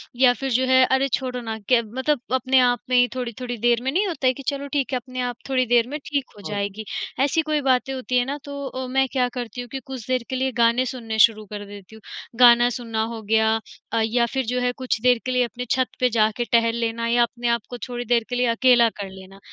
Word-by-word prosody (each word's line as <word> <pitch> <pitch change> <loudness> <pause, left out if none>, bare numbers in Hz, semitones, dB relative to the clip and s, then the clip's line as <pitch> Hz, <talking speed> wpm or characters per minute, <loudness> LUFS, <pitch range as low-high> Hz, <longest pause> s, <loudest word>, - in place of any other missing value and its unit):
या 250 0 +5
फिर 270 +2 -4
जो 255 +2 +2
है, 260 0 +5
अरे, 265 +1 +2
छोड़ो 250 -1 -2
ना 225 -1 -5
क्य 245 -2 +5 0.2
मतलब 295 +1 +1
अपने 260 +1 +3
आप 245 -1 +3
में 255 - +2
ही 245 0 +5
थोड़ी-थोड़ी 245 0 -5
देर 235 +1 +2
में 265 - 0
नहीं 385 +7 +1
होता 315 -7 -1
है, 255 - +4
कि 275 +2 -10
चलो 280 -1 -2
ठीक 280 -2 0
है - - +2
अपने 255 +1 -8
आप 245 -1 -2
थोड़ी 255 -1 +2
देर 240 0 +3
में 295 - -3
ठीक 285 -2 -1
हो - - -11
जाएगी। 205 +1 -4 0.4
ऐसी 290 +3 +2
कोई 305 -1 -1
बातें 265 0 +1
होती 255 -1 -2
हैं 245 - +2
ना, 280 +3 -3
तो 280 -1 -6
अ, 260 0 -5
मैं 265 +1 +1
क्या 255 -2 +1
करती 245 +1 -5
हूँ 245 - -9
कि 270 - -4
कुछ 260 -4 -8
देर 255 -2 0
के 260 - -2
लिए 265 +1 0
गाने 235 +2 +3
सुनने 230 -3 -5
शुरू 215 -1 +5
कर 205 0 -6
देती 200 +1 -12
हूँ। 220 - -15 0.4
गाना 240 -1 +7
सुनना 230 -2 -3
हो 225 - -7
गया 220 +1 +2 0.4
अ, 230 - +2
या 235 +1 +1
फिर 265 -1 -1
जो 250 +2 -1
है 250 - +1
कुछ 255 -4 -2
देर 250 0 +4
के 255 - -1
लिए 250 0 +2
अपने 240 +2 -7
छत 260 -1 +2
पे 250 0 +3
जाके 220 +1 +1
टहल 230 -1 +3
लेना 230 0 -2
या 240 +1 +3
अपने 240 0 -3
आप 235 -1 +1
को 245 - -6
थोड़ी 245 0 -5
देर 235 0 +2
के 245 - -2
लिए 250 0 +2
अकेला 235 0 +4
कर 195 -1 -5
लेना। 190 +1 -13
245 Hz, 260 wpm, -23 LUFS, 230-260 Hz, 0.4 s, गाना